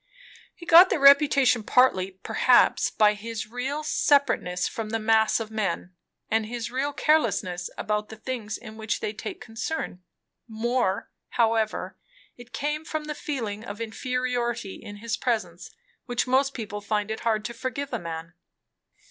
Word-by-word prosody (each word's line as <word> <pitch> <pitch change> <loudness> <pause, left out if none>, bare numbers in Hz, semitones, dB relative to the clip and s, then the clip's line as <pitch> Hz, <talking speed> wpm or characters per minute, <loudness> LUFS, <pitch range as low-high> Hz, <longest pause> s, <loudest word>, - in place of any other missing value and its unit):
He 340 - -12
got 350 +2 +8
the - - +1
reputation 275 -3 +6
partly, 215 -5 +3
perhaps, - - +4
by 210 -1 +4
his 215 +1 -5
real 255 +7 -4
separateness 270 -12 +2
from 220 -2 -5
the 225 - 0
mass 220 0 +3
of 220 -1 -6
men, 195 -4 -2 0.3
and 220 0 0
his 235 -1 -5
real 270 +3 -1
carelessness 210 - +1
about 210 0 -2
the 220 - -8
things 220 -1 -5
in 220 0 -11
which 220 -1 -2
they 210 - -3
take - - -7
concern; 225 - -5 0.5
more, 225 -3 -1 0.3
however, 225 -2 0 0.4
it 245 0 -14
came 300 +2 -2
from 310 -1 -4
the 300 0 -4
feeling 225 -9 -4
of 205 -2 -7
inferiority 240 -1 -2
in 205 - -9
his 225 +2 -3
presence, 190 -8 -2 0.4
which 245 -1 0
most 270 +2 +2
people 205 -3 -5
find 210 0 -1
it 220 - -3
hard 215 -2 0
to 235 - -4
forgive 260 +3 -4
a 240 - -1
man. 165 -1 -7
225 Hz, 155 wpm, -26 LUFS, 210-260 Hz, 0.5 s, got